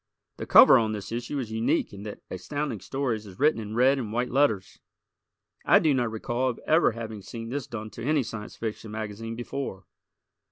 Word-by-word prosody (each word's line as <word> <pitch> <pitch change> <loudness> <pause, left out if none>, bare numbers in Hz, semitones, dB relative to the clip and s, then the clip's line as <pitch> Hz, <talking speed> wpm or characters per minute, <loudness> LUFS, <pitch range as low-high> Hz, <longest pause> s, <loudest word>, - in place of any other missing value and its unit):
The - - -6
cover - - +9
on 110 -1 0
this 105 0 -6
issue 120 +5 -3
is 120 -5 -4
unique 110 -1 0
in 100 - -9
that 105 0 -8
Astounding 130 +6 -3
Stories 115 -1 -3
is 95 -2 -12
written 150 -5 +3
in 105 0 -6
red 130 +3 +4
and 110 -5 -4
white 120 +2 -1
letters. 130 -9 +1 0.8
I - - +6
do 155 -3 +3
not 120 -3 +1
recall 120 +3 -1
of 120 - -5
ever 160 -6 +4
having 110 -2 -6
seen 115 +4 -7
this 135 0 -4
done 110 -2 -6
to - - -8
any 145 +1 +2
Science 115 -2 -7
Fiction 110 -1 -5
magazine 110 +1 -5
before. 120 -5 -5
115 Hz, 195 wpm, -27 LUFS, 110-130 Hz, 0.8 s, cover